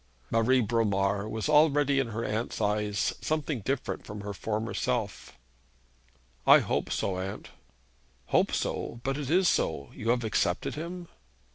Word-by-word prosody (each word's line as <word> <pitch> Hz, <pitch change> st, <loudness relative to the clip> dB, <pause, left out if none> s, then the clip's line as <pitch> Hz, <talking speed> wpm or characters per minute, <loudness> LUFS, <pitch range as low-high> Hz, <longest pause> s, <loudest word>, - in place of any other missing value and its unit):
Marie 120 Hz, +3 st, +4 dB
Bromar 100 Hz, -2 st, +1 dB
was 110 Hz, +3 st, -2 dB
already 145 Hz, -2 st, +4 dB
in 135 Hz, -, 0 dB
her 115 Hz, +1 st, -4 dB
aunt's 110 Hz, +3 st, -2 dB
eyes 105 Hz, -2 st, 0 dB
something 155 Hz, -3 st, -1 dB
different 130 Hz, +6 st, -3 dB
from 105 Hz, -1 st, -7 dB
her 100 Hz, 0 st, -5 dB
former 110 Hz, +2 st, -3 dB
self. -, -, -2 dB, 1.1 s
'I -, -, +10 dB
hope -, -, -1 dB
so, 95 Hz, -1 st, -1 dB
aunt.' 95 Hz, +1 st, -5 dB, 0.8 s
'Hope -, -, +3 dB
so; 115 Hz, -, -2 dB
but 135 Hz, 0 st, -1 dB
it 140 Hz, -3 st, -4 dB
is 180 Hz, +3 st, +4 dB
so, 70 Hz, -, 0 dB
you 115 Hz, -, -4 dB
have 120 Hz, 0 st, +2 dB
accepted 105 Hz, -4 st, 0 dB
him?' 170 Hz, +3 st, -6 dB
115 Hz, 145 wpm, -29 LUFS, 105-140 Hz, 1.1 s, I